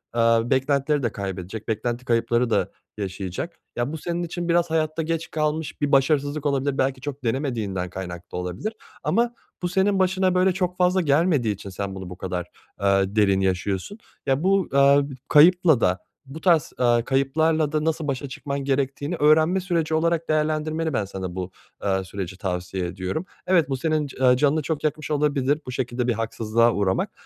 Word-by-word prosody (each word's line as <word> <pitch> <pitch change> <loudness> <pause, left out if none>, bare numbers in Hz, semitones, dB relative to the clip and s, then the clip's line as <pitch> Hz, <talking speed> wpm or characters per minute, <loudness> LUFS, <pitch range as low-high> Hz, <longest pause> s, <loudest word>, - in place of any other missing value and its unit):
eee, 120 - +2 0.3
beklentileri 140 +1 +1
de 115 - 0
kaybedecek, 95 +2 -6
beklenti 120 +3 -2
kayıpları 120 0 +1
da - - +1 0.3
yaşayacak. 95 - -5 0.2
Ya 120 +4 -1
bu 160 - -4
senin 175 +2 -3
için 175 0 -4
biraz 170 0 +3
hayatta 160 0 0
geç 165 +1 -3
kalmış 155 0 -2
bir 145 - +1
başarısızlık 145 +1 +2
olabilir, 140 -1 0
belki 130 -1 0
çok 145 -1 -6
denemediğinden 115 -8 -2
kaynaklı 90 -1 -7
olabilir 90 - -4 0.3
ama 235 +1 +1 0.3
bu 175 - -1
senin 195 +2 +2
başına 185 0 +2
böyle 185 +1 +4
çok 180 -1 -2
fazla 180 +1 +3
gelmediği 145 - +2
için 100 0 -9
sen 95 0 -5
bunu 95 -2 -7
bu 90 - -9
kadar, 90 -1 -4 0.3
eee, 100 0 +2
derin 100 -3 +3
yaşıyorsun, 95 - -1 0.3
ya 135 +3 +1
bu, 195 -1 +2
eee, 140 +1 +6 0.3
kayıpla 165 -3 +6
da, 90 0 +2 0.3
bu 140 +4 -9
tarz, 170 -6 +3
eee, 120 -2 +3
kayıplarla 150 +3 +1
da 155 0 0
nasıl 160 -1 -1
başa 140 0 -2
çıkman 140 +1 -4
gerektiğini 140 +3 -1
öğrenme 155 +5 +4
süreci 170 -4 -1
olarak 165 0 +1
değerlendirmeni 155 0 0
ben 100 - 0
sana 95 -2 -6
bu, 95 0 -4 0.3
eee, 95 -1 +1
süreci 95 0 -6
tavsiye 90 -1 -3
ediyorum. 95 - -4 0.2
Evet, 170 -6 +3
bu 135 - -1
senin 155 +1 0
c 135 - -12
eee, 125 -1 +5
canını 150 +2 +2
çok 150 +1 -3
yakmış 155 0 -2
olabilir, 145 -1 +1
bu 125 - -5
şekilde 125 -1 -2
bir 120 - +2
haksızlığa 115 +1 +1
uğramak 95 -2 0
140 Hz, 175 wpm, -24 LUFS, 105-160 Hz, 0.3 s, eee